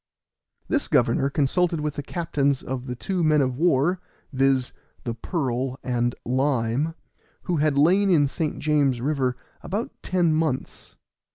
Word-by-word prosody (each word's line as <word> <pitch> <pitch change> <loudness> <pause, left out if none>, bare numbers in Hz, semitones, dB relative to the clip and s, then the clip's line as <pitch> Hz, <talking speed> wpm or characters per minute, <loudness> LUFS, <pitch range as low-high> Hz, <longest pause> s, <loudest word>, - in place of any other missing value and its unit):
This 290 - 0
governor 135 -1 +2
consulted 165 +4 +1
with 150 -1 -2
the 145 - -4
captains 145 -3 -1
of 130 0 -5
the 125 - -4
two 180 +7 -2
men 155 -1 +4
of 130 -2 +1
war, 170 +3 +2 0.3
viz., 135 -1 +2 0.3
the 120 - -3
Pearl 130 -1 -2
and 120 -1 0
Lime, 130 +3 0 0.5
who 175 - -1
had 150 -1 +1
lain 185 +7 +4
in 150 -6 +4
St. 155 +2 -3
James's 145 -4 +1
river 130 -2 0 0.2
about 205 +6 -3
ten 175 -3 +1
months. 155 -4 -2
145 Hz, 145 wpm, -24 LUFS, 130-165 Hz, 0.5 s, men